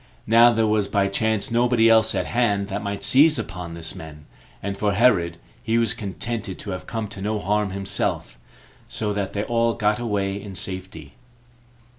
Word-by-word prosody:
Now 115 +2 +6
there 115 -1 +1
was 105 -2 +1
by 100 -2 +1
chance 110 +3 0
nobody 120 -1 +3
else 110 -1 +4
at - - -1
hand 105 -5 0
that 100 +1 -3
might 100 -1 -4
seize 150 +3 +5
upon 90 -6 -6
these 80 -1 -4
men; 75 -2 -11 0.4
and 100 0 -3
for 100 0 0
Herod, 90 -7 +3 0.2
he 115 +1 0
was 115 -2 +2
contented 105 0 -3
to 100 - -6
have 90 - -6
come 115 -2 -3
to 100 -2 -7
no 105 +2 -1
harm 105 0 0
himself, 100 -9 -3 0.5
so 105 -2 -2
that 100 -2 -3
they 100 - -1
all 115 +1 +1
got 105 -1 +1
away 100 -4 -2
in 100 -2 -9
safety. 95 -7 -5
105 Hz, 180 wpm, -23 LUFS, 95-115 Hz, 0.5 s, Now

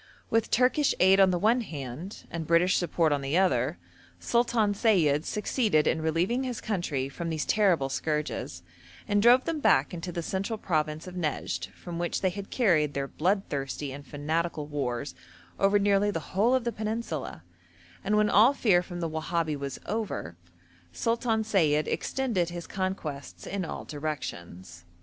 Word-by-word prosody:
With 225 0 +2
Turkish 260 +4 +3
aid 190 +1 +6
on 190 -1 +6
the 180 - +1
one 225 +7 +3
hand, 150 - -7
and 165 -2 -4
British 170 +2 +4
support 170 -2 +1
on 145 -1 +1
the 140 +5 0
other, 145 -5 +2 0.4
Sultan 235 -3 +1
Sayid 165 -9 +2
succeeded 210 - +1
in 160 - +1
relieving 175 +11 0
his 250 -3 -3
country 160 -10 -2
from 165 +5 -5
these 160 -2 -2
terrible 185 -10 +3
scourges, 150 - -3 0.4
and 205 -1 +2
drove 245 +3 +6
them 325 -2 -2
back 145 - +3
into 175 +1 -5
the 170 0 -4
central 195 +6 -2
province 155 -5 -1
of 185 - -8
Nejd, 140 - -2
from 170 -1 -7
which 175 0 -1
they 185 - +2
had 200 +1 -7
carried 160 - +2
their 140 0 -1
bloodthirsty 145 -6 -2
and 140 +1 -8
fanatical 155 +2 -2
wars 140 -3 -3 0.5
over 200 +1 +4
nearly 200 0 +3
the 165 -6 -5
whole 220 +7 +3
of 260 - 0
the 235 - -1
peninsula, 215 - -4 0.6
and, 210 +1 +1
when 210 0 +4
all 225 +8 +5
fear 195 -9 +3
from 175 -1 -7
the 165 - 0
Wahabi 160 0 -1
was 140 -1 -5
over, 205 - -3 0.6
Sultan 230 - 0
Sayid 160 -8 +2
extended 225 -11 -1
his 175 -1 -6
conquests 185 -7 -4
in 195 -1 -3
all - - -6
directions. 90 - -6
175 Hz, 165 wpm, -28 LUFS, 150-210 Hz, 0.6 s, aid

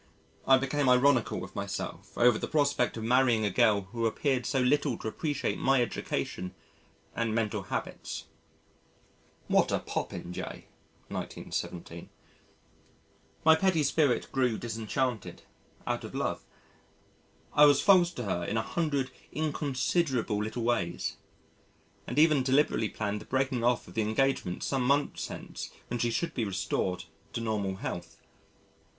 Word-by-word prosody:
I 135 - +8
became 135 +1 +1
ironical 125 -4 +4
with 90 +1 -9
myself 100 -1 -5
over 120 -2 +5
the - - -3
prospect 145 -6 +1
of 110 - -4
marrying 120 -2 +3
a 100 - +1
girl 100 +2 +4
who 115 -1 0
appeared 130 +2 0
so 135 - +1
little 135 0 +2
to - - -6
appreciate 145 +5 -2
my 135 0 +3
education 90 -5 -2 0.6
and 115 -2 0
mental 105 -2 0
habits. 95 - -5 1.2
[What - - +3
a - - +2
popinjay! 90 +1 -5 0.4
1917.] 85 -1 -5 1.4
My 160 0 +8
petty 170 -2 +2
spirit 140 -3 +2
grew 125 -4 +1
disenchanted, 115 +1 -3 0.4
out - - -2
of - - -8
love. - - -2 1.1
I 150 - +8
was 145 -1 +6
false 185 -4 +6
to 125 - -5
her 90 -4 -1
in 110 - -1
a 110 - +1
hundred 140 -1 -1 0.2
inconsiderable 140 -6 0
little 110 +2 -3
ways 90 -8 -1 0.9
and 125 - -4
even 155 -2 +5
deliberately 130 -4 +2
planned 105 -1 -3
the - - -11
breaking 130 -2 0
off 120 0 +2
of - - -12
the 110 - 0
engagement 110 -4 0
some 135 -2 0
months 140 +3 +1
hence - - -7 0.2
when 120 - -2
she 120 - +1
should 170 +9 -1
be 120 - -1
restored 95 -2 -1 0.3
to 115 - -2
normal 105 -4 -1
health. 85 -2 -6
125 Hz, 140 wpm, -29 LUFS, 110-140 Hz, 1.4 s, I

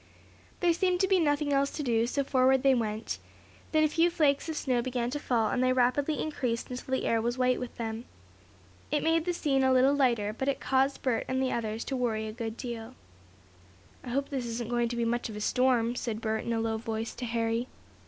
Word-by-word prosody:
There 350 -2 +4
seemed 360 +1 +1
to 380 - +3
be 380 -1 +3
nothing 290 -2 +1
else 275 0 +2
to 300 - -3
do, 230 -3 +1
so 280 +3 0
forward 265 -1 +3
they 270 -1 +5
went. 220 -2 -2 0.5
Then 310 -1 +4
a - - +5
few 330 +3 +3
flakes 300 -3 +1
of 315 - -3
snow 250 -4 +1
began 245 -1 -2
to 295 - -3
fall, 230 -6 +1
and 250 - 0
they 255 0 +3
rapidly 260 +4 +1
increased 250 -6 -2
until 250 +1 -6
the 260 - 0
air 225 -1 +2
was 240 +2 -1
white 255 0 +2
with 250 -1 -6
them. 225 0 -4 0.8
It 295 - 0
made 325 0 +2
the 360 - +1
scene 275 -5 +1
a 260 - +4
little 260 +2 +5
lighter, 235 -7 +1
but 265 - -3
it 280 - 0
caused 270 +1 +1
Bert 250 -4 0
and 260 0 -1
the 265 -1 0
others 220 -1 -2
to 270 - -3
worry 225 -4 -1
a - - -4
good 225 -1 -5
deal. 235 -1 -6 1.1
"I 250 - -7
hope 275 +3 -1
this 265 -4 -3
isn't 230 0 -4
going 240 -1 +1
to 240 - -3
be 235 0 0
much 240 0 -1
of 215 - -7
a - - -5
storm," 245 +1 +2
said 230 -3 -3
Bert 220 -1 -2
in 235 - -1
a 225 - 0
low 225 0 -1
voice 225 0 -4
to 250 - -5
Harry. 230 +1 -1
250 Hz, 230 wpm, -29 LUFS, 230-275 Hz, 1.1 s, they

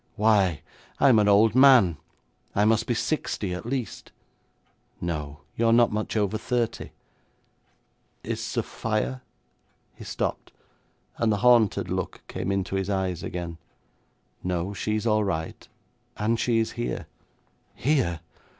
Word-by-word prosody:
Why, 100 -6 +2 0.4
I'm 130 -5 +6
an 105 - +3
old 105 +2 +5
man. 125 - +6 0.6
I 105 - +3
must 110 0 +2
be 120 - 0
sixty 110 - -2
at 90 +5 -6
least.' 125 -5 -4 0.9
'No; 75 -4 -4
you're 115 0 +2
not 120 0 +5
much 105 +1 -2
over 105 0 0
thirty.' 120 -1 -2 1.3
'Is - - -3
Sophia 65 +1 -2 0.4
' - - -42
He - - -8
stopped, - - -4 0.7
and 115 -1 +2
the 105 - +1
haunted 120 -4 +4
look - - -3
came 95 - -3
into 95 0 -1
his 95 0 -2
eyes 95 -3 -1
again. 85 -2 -5 0.8
'No. 90 +2 -2
She 105 +1 -2
is 110 - -2
all 110 -1 +3
right, 80 -5 -4 0.5
and 115 +2 0
she 120 -2 +1
is 110 0 0
here.' 120 +1 -4 0.7
'Here?' 120 - 0
105 Hz, 130 wpm, -26 LUFS, 90-115 Hz, 1.3 s, I'm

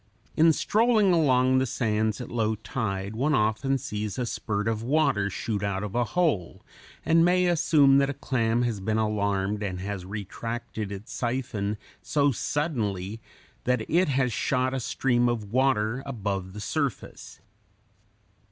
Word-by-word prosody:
In 165 +1 +6
strolling 215 +2 +3
along 130 -5 +3
the 130 - 0
sands 110 -2 0
at - - -7
low 110 -2 0
tide 100 -2 -4
one 140 +6 +1
often 110 +5 +1
sees 105 -4 -4
a 125 - -1
spurt 105 -2 -2
of 110 -1 -1
water 130 -6 +1
shoot 105 +1 -3
out 100 -1 -2
of 105 -2 -5
a 120 - +2
hole, 135 - -1 0.4
and 165 +2 +4
may 180 +1 +3
assume 150 -5 +4
that 140 0 +2
a 140 - -3
clam 120 -2 0
has 115 -4 -1
been 110 +3 -1
alarmed 100 -2 0
and 95 -3 -3
has 100 -1 -4
retracted 105 +2 -5
its 100 +2 -8
siphon 120 -4 -2 0.2
so 145 -1 +2
suddenly 110 - -2 0.4
that 125 -3 0
it 175 0 +2
has 130 -3 +1
shot 130 +3 0
a 135 - -1
stream 120 0 +1
of 110 -4 -3
water 125 -2 +2
above 100 -7 -3
the 105 - -7
surface. 140 +1 -4
115 Hz, 150 wpm, -26 LUFS, 105-135 Hz, 0.4 s, In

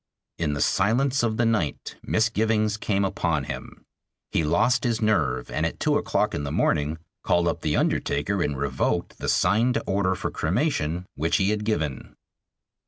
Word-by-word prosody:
In 75 -3 0
the 70 - -2
silence 125 +7 +2
of 110 -2 0
the 120 - +2
night 105 -10 -1
misgivings 110 -1 +1
came 100 -2 0
upon 95 - -1
him. - - -8 0.5
He 80 - +1
lost 125 - +2
his 115 -3 0
nerve, 110 -2 0
and - - -1
at - - -2
two - - +2
o'clock - - 0
in 70 - -2
the 70 - -3
morning 75 +2 +1 0.3
called 85 0 +2
up 85 - -1
the 75 - 0
undertaker 85 +7 0
and 75 -4 -1
revoked 65 -2 -1
the - - -2
signed 115 +4 +3
order 95 -1 +1
for - - -4
cremation 90 - -1
which 80 +3 +1
he 95 +1 +2
had 105 0 -1
given. 80 - -2
100 Hz, 170 wpm, -25 LUFS, 80-110 Hz, 0.5 s, signed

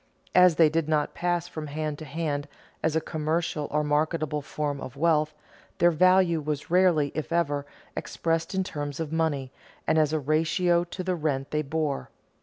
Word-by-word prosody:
As 180 -2 +6
they 165 -1 +6
did 155 0 0
not 150 -1 +1
pass 175 -1 -1
from 155 -3 -6
hand 150 0 -3
to 155 - -7
hand 145 0 -3 0.3
as 160 0 0
a 160 - +2
commercial 155 -1 -2
or 150 0 +1
marketable 150 0 0
form 145 0 -3
of 130 - -7
wealth, 155 -1 +2 0.4
their 175 - +5
value 185 0 +4
was 150 +1 -4
rarely, 175 -6 +4
if 155 +2 -4
ever, 145 -4 0 0.3
expressed 165 +2 -2
in 190 - +1
terms 145 -4 -5
of 160 -1 -3
money 145 -5 0 0.3
and 160 - +3
as 155 -1 +3
a 155 - +1
ratio 165 +4 +2
to 185 +1 -6
the 185 0 0
rent 145 -4 -2
they 150 - +1
bore. 155 -1 -2
155 Hz, 180 wpm, -27 LUFS, 150-170 Hz, 0.4 s, As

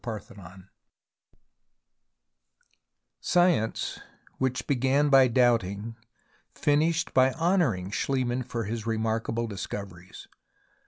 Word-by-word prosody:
CHAPTER 110 -3 -6
XIV 95 -1 -14 2.5
SCIENCE, 175 -11 +1 0.4
which 130 -1 -1
began 140 +2 +1
by 135 -2 +6
doubting, 115 -3 +1 0.6
finished 160 +3 +1
by 130 0 +4
honouring 165 - 0
SchHemann 130 +1 -1
for 115 -2 -3
his 110 +1 -5
remark 110 0 -1
able 115 +1 -1
discoveries. 95 -3 -8
120 Hz, 90 wpm, -27 LUFS, 105-135 Hz, 2.5 s, by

